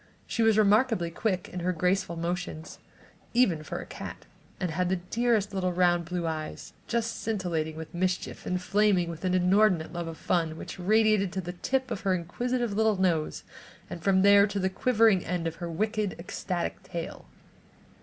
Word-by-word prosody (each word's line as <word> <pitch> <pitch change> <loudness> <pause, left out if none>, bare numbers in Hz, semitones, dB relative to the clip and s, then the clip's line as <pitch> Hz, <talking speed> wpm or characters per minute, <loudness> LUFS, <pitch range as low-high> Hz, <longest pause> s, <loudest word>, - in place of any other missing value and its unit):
She 230 - -2
was 225 -1 +4
remarkably 210 -4 +3
quick 185 0 -1
in 180 - -5
her 180 +1 0
graceful 180 +1 0
motions, 170 -1 -4 0.6
even 190 -11 +3
for 155 - -5
a - - -6
cat, - - -8 0.3
and 180 -3 -1
had 180 +2 0
the 190 - +2
dearest 210 +3 0
little 185 -2 0
round 175 -1 +2
blue 175 0 -3
eyes, 155 -1 -5
just 230 -1 -1
scintillating 170 -7 -2
with 160 0 -8
mischief 180 +1 -2
and 180 - 0
flaming 190 -2 +2
with 165 +1 -9
an 185 0 +2
inordinate 185 -2 +3
love 170 -1 -4
of 165 -1 -6
fun 165 -3 0
which - - -8
radiated 215 0 +3
to 190 - -2
the 175 0 -6
tip 260 +7 -1
of 205 - -3
her 190 -2 +2
inquisitive 240 +7 -2
little 220 0 +2
nose 170 -5 0 0.5
and 170 - -6
from 190 +1 +3
there 200 0 +7
to 205 0 -4
the 190 -1 0
quivering 220 -3 +3
end 180 -1 -2
of 165 0 -3
her 175 -1 -5
wicked, 210 +3 -1
ecstatic 175 0 -4
tail. 170 -1 -6
185 Hz, 180 wpm, -28 LUFS, 170-210 Hz, 0.6 s, there